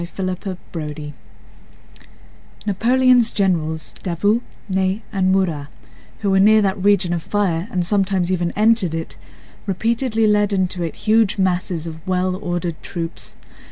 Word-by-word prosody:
CHAPTER 185 +3 -6 0.5
XXXIV 150 -2 -5 1.5
Napoleon's 245 +3 +4
generals—Davout, 180 +3 0 0.3
Ney, 190 +2 0
and 185 -2 +2
Murat, 170 -7 0 0.5
who 200 -2 +1
were 190 - +4
near 215 +2 +6
that 195 -2 0
region 200 -3 +3
of 170 - -2
fire 185 -2 -1
and 180 -2 -1
sometimes 190 -2 +1
even 175 -2 0
entered 215 -5 +3
it—repeatedly 225 +7 -3
led 210 -1 +3
into 185 -2 0
it 165 -2 -3
huge 215 -1 +3
masses 180 -3 0
of 160 -1 -7
well 185 0 0
ordered 175 -3 -3
troops. 170 -2 -5
190 Hz, 125 wpm, -20 LUFS, 175-205 Hz, 1.5 s, near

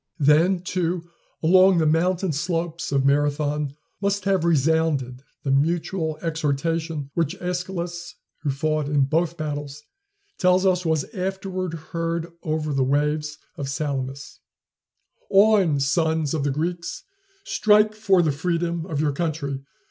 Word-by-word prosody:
Then, 165 +5 +3
too, 175 -1 -2 0.3
along 185 +2 +6
the 160 - +3
mountain 175 +3 +1
slopes 170 +2 -2
of 135 -1 +2
Marathon 145 0 +1 0.3
must 200 -1 0
have 195 -4 +2
resounded 155 -5 +1 0.2
the 140 - 0
mutual 160 +2 0
exhortation 160 -1 -2
which 170 +2 -1
Æschylus, 180 -1 -4 0.3
who 145 - -1
fought 155 +2 0
in 145 -1 +2
both 165 +4 0
battles, 145 -2 -5 0.6
tells 185 +1 +3
us 180 -2 +2
was 160 -3 +1
afterward 185 -2 -3 0.2
heard 165 0 -2
over 155 -1 -2
the 135 -1 +2
waves 150 +3 0 0.2
of 140 -2 -4
Salamis: 140 -1 -4 0.9
"On, 195 -7 +4
sons 160 +1 +1
of 155 -3 -1
the 145 - +1
Greeks! 170 +4 -3 0.4
Strike 210 - +3
for 195 -4 +3
the 155 - +2
freedom 170 +2 -2
of 155 -5 -3
your 150 -1 +2
country! 140 -3 -2
160 Hz, 130 wpm, -24 LUFS, 145-180 Hz, 0.9 s, along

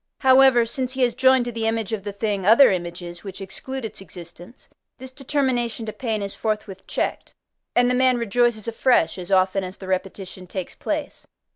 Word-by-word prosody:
However, 260 -2 +6
since 255 +2 -2
he 260 -1 0
has 240 -1 +2
joined 260 0 +4
to 240 - -3
the 225 -1 -2
image 225 -1 -1
of 205 -3 -3
the 205 - -4
thing 200 -1 -2
other 225 +7 +7
images, 175 -1 -5
which 195 -2 -8
exclude 235 +7 -6
its 215 - -6
existence, 175 +5 -11 0.3
this 260 0 -9
determination 260 -4 -1
to 215 - -5
pain 220 -5 -3
is 200 - -4
forthwith 210 -3 -4
checked, - - -3 0.4
and 245 0 +4
the 250 - +2
man 255 0 +3
rejoices 235 -1 +1
afresh 230 -7 +2
as 180 +1 -7
often 190 +1 +3
as 185 +1 -7
the 190 - -10
repetition 185 0 -4
takes 185 0 -5
place. - - -5
220 Hz, 185 wpm, -23 LUFS, 190-250 Hz, 0.4 s, other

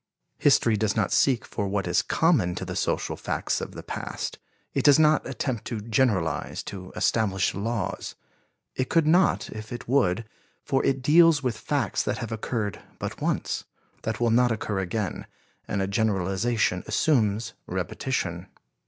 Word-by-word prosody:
History 115 -2 +4
does 105 0 0
not 105 -4 +1
seek 130 -4 +3
for 100 - -3
what 100 0 -1
is 90 - +2
common 120 - +2
to - - -4
the - - -5
social - - -1
facts - - -2
of - - -6
the - - -7
past; - - -5 0.3
it - - 0
does 145 0 +7
not 155 -1 +4
attempt 130 -2 -3
to 115 - -3
generalize, 105 - 0
to 95 -2 -8
establish 100 -4 +1
laws. 100 -1 -3 0.6
It 130 - -1
could 165 -2 +3
not 175 +4 +3
if 110 0 -8
it 120 0 -6
would, 115 -5 +2 0.4
for 135 - +1
it 135 -1 +1
deals 160 +1 +6
with 125 -3 0
facts 140 +3 -1
that - - -1
have 115 -3 -5
occurred 110 -2 -3 0.2
but - - -5
once, - - -1 0.4
that 110 0 -3
will 120 -1 +2
not 120 +1 +4
occur 105 -2 -2
again, 95 0 -3 0.4
and 100 - -1
a - - -1
generalization 100 0 0
assumes 115 -7 +1
repetition. 90 -9 -3
110 Hz, 160 wpm, -26 LUFS, 100-130 Hz, 0.6 s, does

